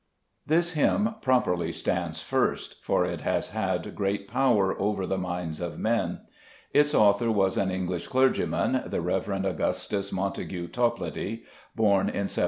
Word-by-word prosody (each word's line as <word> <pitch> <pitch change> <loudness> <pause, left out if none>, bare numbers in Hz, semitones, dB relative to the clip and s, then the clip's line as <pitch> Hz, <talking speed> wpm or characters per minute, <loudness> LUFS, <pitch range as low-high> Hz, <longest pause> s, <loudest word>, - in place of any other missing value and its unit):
This 170 +3 +2
hymn 205 +7 +2
properly 125 -10 +2
stands - - -2
first, - - -1
for 90 - +2
it 85 -3 -4
has - - -1
had - - -2
great 100 0 -2
power 115 -6 +2
over 100 -1 0
the 95 +1 -1
minds 90 -3 -4
of 85 -1 -4
men. 115 +1 0 0.5
Its 145 0 +4
author 105 +2 +4
was 95 -3 +2
an 95 - +1
English 90 -1 -3
clergyman, 130 0 +2
the - - -1
Rev. 95 -1 -1
Augustus 100 +2 -1
Montague 95 -2 -3
Toplady, 115 -2 -2 0.3
born 100 -4 +3
in 100 - -2
1740. - - -3
100 Hz, 145 wpm, -27 LUFS, 95-120 Hz, 0.5 s, Its